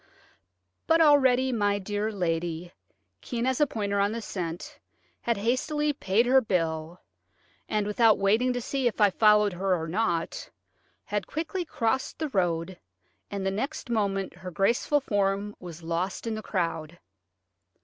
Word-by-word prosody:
But 325 Hz, 0 st, +4 dB
already 265 Hz, -4 st, +5 dB
my 205 Hz, -4 st, +1 dB
dear 205 Hz, +2 st, -2 dB
lady, 170 Hz, -2 st, -2 dB, 0.5 s
keen 240 Hz, -1 st, -3 dB
as 260 Hz, +2 st, 0 dB
a 295 Hz, -, +5 dB
pointer 200 Hz, -4 st, -2 dB
on 200 Hz, +1 st, +2 dB
the 230 Hz, -, -3 dB
scent, 175 Hz, -4 st, -5 dB, 0.4 s
had 235 Hz, -2 st, 0 dB
hastily 295 Hz, +7 st, 0 dB
paid 215 Hz, -2 st, +1 dB
her 260 Hz, +2 st, +5 dB
bill, 165 Hz, -4 st, -2 dB, 0.7 s
and, 210 Hz, -1 st, 0 dB
without 215 Hz, +1 st, +4 dB
waiting 220 Hz, +6 st, +2 dB
to 245 Hz, -, -2 dB
see 265 Hz, +1 st, -1 dB
if 235 Hz, -, -2 dB
I 205 Hz, -2 st, +5 dB
followed 210 Hz, -1 st, +4 dB
her 185 Hz, +1 st, +1 dB
or 160 Hz, -, -4 dB
not, 170 Hz, -2 st, -1 dB, 0.6 s
had 205 Hz, -1 st, -2 dB
quickly 335 Hz, +4 st, -3 dB
crossed 260 Hz, -4 st, -1 dB
the 310 Hz, -1 st, -2 dB
road, 175 Hz, -4 st, -1 dB, 0.5 s
and 200 Hz, -1 st, -4 dB
the 195 Hz, -, +1 dB
next 245 Hz, +5 st, -4 dB
moment 195 Hz, -4 st, 0 dB
her 185 Hz, +1 st, -8 dB
graceful 235 Hz, -, +1 dB
form 205 Hz, -3 st, 0 dB
was 170 Hz, -2 st, -9 dB
lost 170 Hz, +6 st, -2 dB
in 225 Hz, -, -2 dB
the 215 Hz, -, -4 dB
crowd. 170 Hz, -5 st, -3 dB
205 Hz, 150 wpm, -27 LUFS, 185-245 Hz, 0.7 s, already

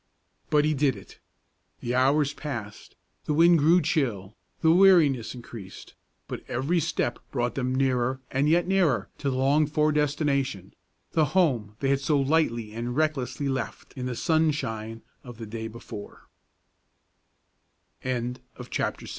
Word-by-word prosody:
But 150 Hz, 0 st, +3 dB
he 155 Hz, -, +2 dB
did 140 Hz, -3 st, +1 dB
it. 100 Hz, -, -14 dB, 0.6 s
The 120 Hz, -, -3 dB
hours 140 Hz, +3 st, +3 dB
passed, 115 Hz, -10 st, -7 dB, 0.3 s
the 150 Hz, -, 0 dB
wind 170 Hz, +1 st, +6 dB
grew 165 Hz, +4 st, +4 dB
chill, 115 Hz, -, -1 dB, 0.3 s
the 160 Hz, -, +5 dB
weariness 165 Hz, -, +4 dB
increased; 115 Hz, -5 st, -10 dB, 0.3 s
but -, -, -6 dB
every 140 Hz, +9 st, 0 dB
step 145 Hz, -6 st, -1 dB
brought 120 Hz, -3 st, -1 dB
them 130 Hz, -1 st, -1 dB
nearer 130 Hz, -1 st, +1 dB
and 140 Hz, +3 st, +1 dB
yet 170 Hz, +2 st, +3 dB
nearer 165 Hz, -, +2 dB
to 140 Hz, -, -1 dB
the 130 Hz, -, -2 dB
longed 145 Hz, +3 st, +2 dB
for 150 Hz, 0 st, +2 dB
destination, 140 Hz, -, -1 dB, 0.4 s
the 160 Hz, -2 st, +3 dB
home 120 Hz, -, +2 dB
they 135 Hz, -, +1 dB
had 140 Hz, 0 st, +2 dB
so 145 Hz, +1 st, +1 dB
lightly 135 Hz, -7 st, +1 dB
and 120 Hz, +2 st, -4 dB
recklessly 145 Hz, -3 st, -1 dB
left 135 Hz, -1 st, -4 dB
in 125 Hz, -1 st, -5 dB
the 125 Hz, -, -3 dB
sunshine 115 Hz, -9 st, -1 dB, 0.2 s
of 120 Hz, -2 st, -10 dB
the 115 Hz, -2 st, -8 dB
135 Hz, 130 wpm, -26 LUFS, 120-155 Hz, 0.6 s, wind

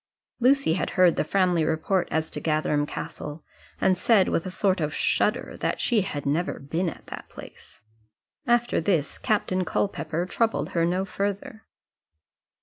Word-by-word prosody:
Lucy 260 Hz, -, +4 dB
had 180 Hz, -, -1 dB
heard 180 Hz, -2 st, +6 dB
the -, -, +1 dB
Framley 180 Hz, -1 st, +2 dB
report 160 Hz, +4 st, 0 dB
as 160 Hz, 0 st, -1 dB
to -, -, -4 dB
Gatherum 155 Hz, -2 st, +1 dB
Castle, 150 Hz, +1 st, -6 dB, 0.4 s
and 190 Hz, -, +3 dB
said 195 Hz, +1 st, +3 dB
with 170 Hz, -, -1 dB
a -, -, -3 dB
sort 185 Hz, -1 st, +1 dB
of 150 Hz, 0 st, -2 dB
shudder -, -, 0 dB
that -, -, -1 dB
she 230 Hz, -4 st, +2 dB
had 145 Hz, -7 st, -4 dB
never 160 Hz, +6 st, 0 dB
been 165 Hz, +6 st, -2 dB
at -, -, -11 dB
that -, -, -9 dB
place. -, -, -13 dB, 0.7 s
After 240 Hz, -4 st, +2 dB
this, 160 Hz, -5 st, 0 dB
Captain 190 Hz, -3 st, 0 dB
Culpepper 170 Hz, -1 st, -1 dB
troubled 225 Hz, +4 st, 0 dB
her 165 Hz, -1 st, +1 dB
no 185 Hz, +2 st, 0 dB
further. 200 Hz, +2 st, -4 dB
180 Hz, 155 wpm, -25 LUFS, 160-195 Hz, 0.7 s, heard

